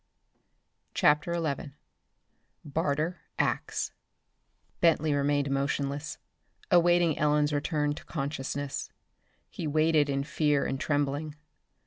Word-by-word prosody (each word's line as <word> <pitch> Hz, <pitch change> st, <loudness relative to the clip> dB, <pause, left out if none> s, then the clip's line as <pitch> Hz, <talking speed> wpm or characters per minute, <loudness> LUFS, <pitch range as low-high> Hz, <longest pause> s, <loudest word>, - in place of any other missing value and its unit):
CHAPTER 150 Hz, +3 st, +3 dB
XI 150 Hz, -4 st, -2 dB, 0.9 s
Barter 155 Hz, +3 st, -1 dB, 0.2 s
Acts -, -, -1 dB, 0.9 s
Bentley 160 Hz, -3 st, +3 dB
remained 145 Hz, 0 st, +1 dB
motionless, 140 Hz, +2 st, -1 dB, 0.5 s
awaiting 175 Hz, -2 st, +4 dB
Ellen's 150 Hz, 0 st, +2 dB
return 150 Hz, 0 st, 0 dB
to -, -, -10 dB
consciousness. 140 Hz, -1 st, -3 dB, 0.6 s
He 160 Hz, -, -4 dB
waited 155 Hz, 0 st, +3 dB
in 140 Hz, 0 st, 0 dB
fear 150 Hz, -1 st, +1 dB
and 135 Hz, -, -2 dB
trembling. 145 Hz, +1 st, -1 dB
150 Hz, 90 wpm, -29 LUFS, 140-155 Hz, 0.9 s, awaiting